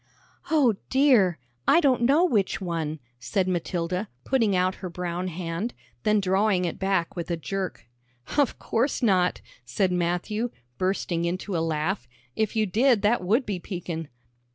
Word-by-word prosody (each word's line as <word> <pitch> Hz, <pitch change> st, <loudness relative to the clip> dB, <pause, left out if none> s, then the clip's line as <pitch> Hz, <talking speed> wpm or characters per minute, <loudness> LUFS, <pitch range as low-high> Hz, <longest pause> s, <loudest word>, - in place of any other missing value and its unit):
"O 285 Hz, -8 st, +4 dB, 0.2 s
dear! 250 Hz, -, +4 dB, 0.3 s
I 330 Hz, -, +6 dB
don't 270 Hz, -7 st, +3 dB
know 285 Hz, +9 st, +4 dB
which 210 Hz, -, +1 dB
one," 165 Hz, -4 st, -3 dB, 0.2 s
said 130 Hz, -, 0 dB
Matilda, 180 Hz, +2 st, -2 dB
putting 230 Hz, -7 st, +2 dB
out 185 Hz, +1 st, +2 dB
her 185 Hz, -, -4 dB
brown 175 Hz, +1 st, -3 dB
hand, 175 Hz, +5 st, -4 dB, 0.3 s
then 215 Hz, -1 st, +3 dB
drawing 190 Hz, -1 st, +2 dB
it 170 Hz, -, -4 dB
back 190 Hz, -3 st, 0 dB
with 170 Hz, -1 st, -4 dB
a 170 Hz, -, 0 dB
jerk. 185 Hz, -, -4 dB, 0.5 s
"Of 285 Hz, -3 st, +2 dB
course 245 Hz, +3 st, -1 dB
not," 185 Hz, -5 st, +3 dB, 0.2 s
said 180 Hz, +11 st, 0 dB
Matthew, 180 Hz, +6 st, -1 dB, 0.3 s
bursting 185 Hz, -2 st, 0 dB
into 185 Hz, +2 st, -2 dB
a 165 Hz, -, +1 dB
laugh; 160 Hz, -1 st, -1 dB, 0.3 s
"if 220 Hz, 0 st, 0 dB
you 220 Hz, -1 st, +3 dB
did 225 Hz, +3 st, +3 dB
that 210 Hz, -1 st, +3 dB
would 225 Hz, +8 st, +2 dB
be 195 Hz, -3 st, -3 dB
peekin'." 170 Hz, -3 st, -5 dB
185 Hz, 155 wpm, -26 LUFS, 175-220 Hz, 0.5 s, I